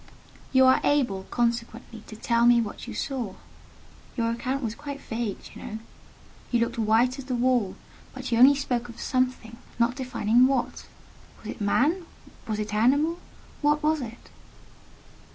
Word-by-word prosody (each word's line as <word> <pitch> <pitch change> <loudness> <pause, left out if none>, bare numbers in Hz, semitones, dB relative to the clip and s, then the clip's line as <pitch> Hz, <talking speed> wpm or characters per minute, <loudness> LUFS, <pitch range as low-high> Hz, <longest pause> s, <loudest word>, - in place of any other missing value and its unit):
"You 260 -1 +6
are 260 - +5
able, 240 -10 +1
consequently, 235 -1 -2
to 215 - -9
tell 235 +2 +2
me 240 0 +6
what 225 +1 -4
you - - -6
saw? 245 -8 -3 0.8
Your 230 -1 +1
account 260 +4 -2
was 220 -2 -2
quite 285 +2 -7
vague, 225 -5 -4
do - - -12
you - - -10
know? 220 - -6 0.7
You 240 - +2
looked 235 0 -1
white 230 +4 +2
as 270 - -7
the 255 -2 -2
wall; 245 -5 +1 0.4
but 260 -1 -7
you 230 - +2
only 270 +3 +8
spoke 245 -4 -2
of 235 - -11
'something,' 255 -3 -1 0.2
not 235 +1 +2
defining 250 -2 +3
what. 265 -3 -2 0.6
Was - - -7
it - - -10
a - - -3
man? 315 - +1 0.4
Was 215 -1 -2
it 210 0 -4
an 210 - +1
animal? 300 +7 +3 0.4
What 295 0 +2
was 310 -1 +2
it?" 235 -1 -9
240 Hz, 170 wpm, -26 LUFS, 230-265 Hz, 0.8 s, only